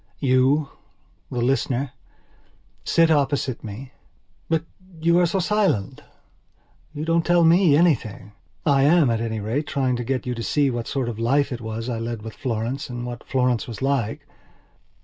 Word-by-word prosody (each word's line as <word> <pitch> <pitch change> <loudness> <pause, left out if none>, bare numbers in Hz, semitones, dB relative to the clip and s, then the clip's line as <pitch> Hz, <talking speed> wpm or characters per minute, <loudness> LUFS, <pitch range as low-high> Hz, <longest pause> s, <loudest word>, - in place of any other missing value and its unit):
You, 135 +2 +2 0.6
the 120 -1 -2
listener, 130 0 0 0.9
sit 165 -1 +3
opposite 140 -4 0
me. 115 +5 -8 0.6
But 160 -1 +1 0.4
you 170 +2 +3
are 175 - +4
so 175 - -1
silent. 190 - 0 0.9
You 150 +1 -5
don't 165 0 +2
tell 175 0 +3
me 165 -2 +5
anything. 115 - +1 0.3
I 140 -2 +4
am, 150 -2 +4
at 115 -1 -1
any 110 -1 -2
rate, 115 +9 -2
trying 130 -3 0
to 120 - -3
get 130 +2 -2
you 125 - -2
to 115 - -5
see 140 +3 +1
what 120 -1 -4
sort 135 -4 -2
of 115 -2 -5
life 140 +5 +1
it 125 -1 -5
was 110 +1 -5
I 120 -3 -2
led 115 -1 -4
with 110 -1 -7
Florence 125 +4 -3
and 120 0 -5
what 120 -1 -7
Florence 125 -3 0
was 115 - -7
like. 135 -6 -1
130 Hz, 170 wpm, -23 LUFS, 115-150 Hz, 0.9 s, me